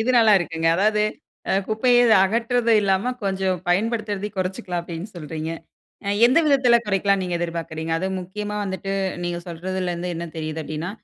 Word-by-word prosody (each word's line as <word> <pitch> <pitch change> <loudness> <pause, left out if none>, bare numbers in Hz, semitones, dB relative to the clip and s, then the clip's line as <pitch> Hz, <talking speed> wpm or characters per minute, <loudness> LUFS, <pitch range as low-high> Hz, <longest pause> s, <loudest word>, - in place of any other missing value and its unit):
இது 235 +3 +1
நல்லா 225 -2 +6
இருக்குங்க. 165 -1 -3
அதாவது, 210 +2 +2 0.5
"அ - - +2 0.2
குப்பைய 240 +3 +3 0.3
அகற்றுறதும் 230 +1 +2
இல்லாம, 200 +6 +1
கொஞ்சம் 190 -2 0
பயன்படுத்துறதையும் 210 +1 -1
கொறைச்சுக்கலாம்." 185 -1 -2
அப்படீன்னு 170 +4 -7
சொல்றீங்க. 160 0 -5 0.6
அ - - -1 0.2
எந்த 260 +6 +4
விதத்தில 265 -4 +5
குறைக்கலாம்ன்னு 195 -1 +1
நீங்க 175 -1 -2
எதிர்பார்க்குறீங்க? 165 -1 -4
அதுவும் 190 +1 -2
முக்கியமா 210 +3 -5
வந்துட்டு 190 0 -4 0.3
நீங்க 175 0 -2
சொல்றதிலருந்து 180 0 -3
என்ன 170 +1 -4
தெரியுது 155 0 -4
அப்படீன்னா, 155 +4 -4
190 Hz, 145 wpm, -23 LUFS, 170-215 Hz, 0.6 s, நல்லா